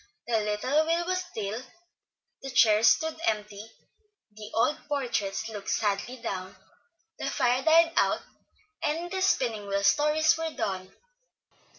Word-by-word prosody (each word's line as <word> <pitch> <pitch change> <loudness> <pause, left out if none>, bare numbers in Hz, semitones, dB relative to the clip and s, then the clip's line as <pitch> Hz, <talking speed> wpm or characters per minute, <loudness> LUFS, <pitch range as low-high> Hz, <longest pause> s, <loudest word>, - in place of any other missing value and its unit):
The 230 -2 +1
little 235 +9 0
wheel 335 +1 +1
was 370 +1 0
still, 225 - -5 0.8
the 270 - -6
chairs 220 -3 +5
stood 320 +8 +2
empty, 210 0 -3 0.6
the 210 0 -10
old 230 +7 +2
portraits 220 -7 -2
looked 210 -3 -7
sadly 210 +4 -1
down, 185 -5 -5 0.6
the - - -2
fire 245 +1 +1
died 330 +2 +5
out, - - +2 0.6
and 335 +4 -2
the 380 -1 -2
Spinning 225 - +1
Wheel 200 0 -1
Stories 300 +8 +3
were 325 -1 -3
done. 185 -1 -3
230 Hz, 130 wpm, -27 LUFS, 210-315 Hz, 0.8 s, chairs